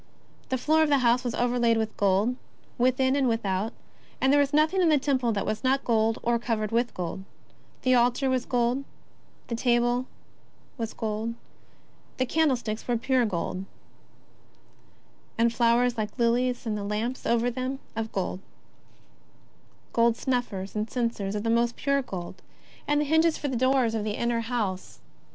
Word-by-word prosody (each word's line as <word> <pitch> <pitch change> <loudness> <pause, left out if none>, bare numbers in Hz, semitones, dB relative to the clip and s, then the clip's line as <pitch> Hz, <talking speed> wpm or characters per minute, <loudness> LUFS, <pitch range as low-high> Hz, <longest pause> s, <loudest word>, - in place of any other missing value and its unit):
The 260 - 0
floor 310 +5 +2
of 315 - +3
the 285 - +4
house 240 +2 +3
was 245 -2 -2
overlaid 240 -1 +2
with 220 -1 -2
gold 200 +5 +2 0.4
within 260 +2 +3
and 275 -2 +2
without, 215 -2 -1 0.5
and 265 +1 +3
there 290 - +5
was 285 -1 +2
nothing 310 +5 +3
in 345 - +4
the 305 - +5
Temple 260 -4 +1
that 200 -2 -2
was 215 - -3
not 265 +1 +2
gold 225 -1 +2
or 235 0 +1
covered 220 -3 -2
with 235 +1 +1
gold 180 +1 -4 0.3
— - - -33
the 255 - +3
altar 250 +2 +3
of 255 -1 -2
gold, 240 0 +2
and 275 - -7 0.6
the 235 - -3
table 240 +1 +1 0.7
of 225 -1 -4
gold, 220 0 -2
and 230 - -4 0.8
the 255 - +1
golden - - -11
candlesticks 245 -9 0
of 240 -2 +1
pure 260 -3 +2
gold, 185 0 -3 1.7
and 230 0 +3
flowers 235 0 +2
like 210 +2 -4
lilies, 245 +1 +1
and 220 -2 -1
the 205 - -4
lamps 215 +5 -3
over 235 +1 +2
them 255 +2 -3 0.2
of 225 0 -3
gold, 185 -1 -2
and - - -33
golden 230 0 +3
snuffers, 230 -7 -2
and 215 +1 -2
censers 230 -5 -2
of 210 - -2
most 235 +1 +2
pure 280 0 +1
gold, 185 -6 -7 0.5
and 295 0 +2
the - - 0
hinges 320 +2 +3
for 290 - -3
the 260 - -2
doors 255 -1 +2
of 220 -2 -1
the 210 0 -3
inner 235 0 0
house 225 -6 -2
60 - - -16
JESUS - - -17
OF - - -30
NAZARETH. - - -33
235 Hz, 185 wpm, -27 LUFS, 220-260 Hz, 1.7 s, there